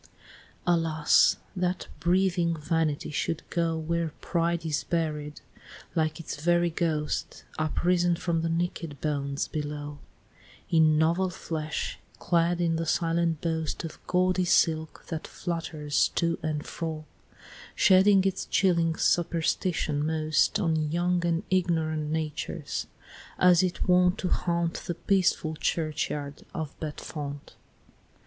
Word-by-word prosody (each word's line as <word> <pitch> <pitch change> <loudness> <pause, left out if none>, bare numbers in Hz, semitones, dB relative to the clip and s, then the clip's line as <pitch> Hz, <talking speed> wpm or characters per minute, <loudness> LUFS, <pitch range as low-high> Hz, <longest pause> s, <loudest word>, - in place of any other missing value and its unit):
Alas! 165 -3 +4 0.2
That 180 -1 -1
breathing 175 0 +2
Vanity 155 -1 -1
should 160 +2 -2
go 165 -2 0
Where 165 0 -2
Pride 170 -1 -1
is 155 -2 -1
buried, 150 -3 -2 0.5
like 160 -1 0
its 165 - -6
very 175 0 +3
ghost, 160 -3 -2 0.2
Uprisen 175 +3 +2
from 170 -1 -1
the 165 - -1
naked 165 -3 -2
bones 140 -2 -2
below, 145 -1 -5 0.7
In 155 -2 +5
novel 170 +4 +2
flesh, 160 -3 -4 0.2
clad 170 0 +1
in 165 -2 +1
the 165 - -2
silent 165 -1 +1
boast 160 -1 -2
Of 165 - -7
gaudy 185 0 +2
silk 160 -2 +1
that 160 -2 -4
flutters 160 -4 -1
to 170 0 +1
and 150 -1 -2
fro, 160 -2 -5 0.7
Shedding 190 0 +6
its 190 0 -1
chilling 170 -4 +2
superstition 165 -2 +1
most 155 +4 +1
On 160 -5 0
young 175 +1 +1
and 170 0 0
ignorant 160 -4 +1
natures 155 -2 -3 0.5
as 180 -2 +6
it 185 0 -1
wont 180 +1 +4
To 180 - -2
haunt 170 -1 0
the 175 - -2
peaceful 175 -4 +1
churchyard 150 -3 -2
of 160 -3 -4
Bedfont! 145 -2 -6
165 Hz, 120 wpm, -27 LUFS, 155-175 Hz, 0.7 s, Shedding